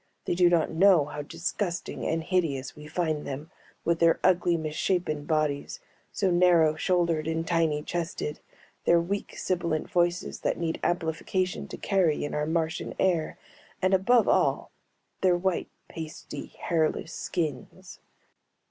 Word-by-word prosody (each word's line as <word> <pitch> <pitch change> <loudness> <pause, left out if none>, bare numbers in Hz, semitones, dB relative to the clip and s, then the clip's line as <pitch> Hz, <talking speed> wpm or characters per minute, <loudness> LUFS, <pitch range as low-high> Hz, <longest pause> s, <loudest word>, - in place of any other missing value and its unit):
They - - 0
do 175 0 +5
not 170 -2 +2
know 175 -2 +5
how 150 0 -6
disgusting 175 +4 -3
and 165 0 0
hideous 160 -7 -1
we 150 0 -11
find 155 -2 -1
them, 145 +4 -6 0.3
with 170 -1 +2
their 165 -1 +4
ugly 175 -2 +3
misshapen 155 -1 -1
bodies, 155 -3 -1 0.3
so 195 -3 +1
narrow 175 -3 +5
shouldered 170 -2 +1
and 160 0 -1
tiny 165 -3 +1
chested, 165 -3 -3 0.5
their 170 - +5
weak 195 +4 -3
sibilant 170 -4 -1
voices 175 -1 0
that - - -1
need 165 -1 -2
amplification 175 +2 -1
to - - -8
carry 180 -8 +1
in - - -5
our 150 0 -1
Martian 160 0 -1
air, 170 -5 +1 0.4
and 185 +1 +2
above 220 +5 +4
all - - +2 0.5
their 180 -2 +4
white 185 0 -1 0.2
pasty 155 -2 -7
hairless 160 0 -1
skins. 155 -7 -4
165 Hz, 140 wpm, -27 LUFS, 155-180 Hz, 0.5 s, do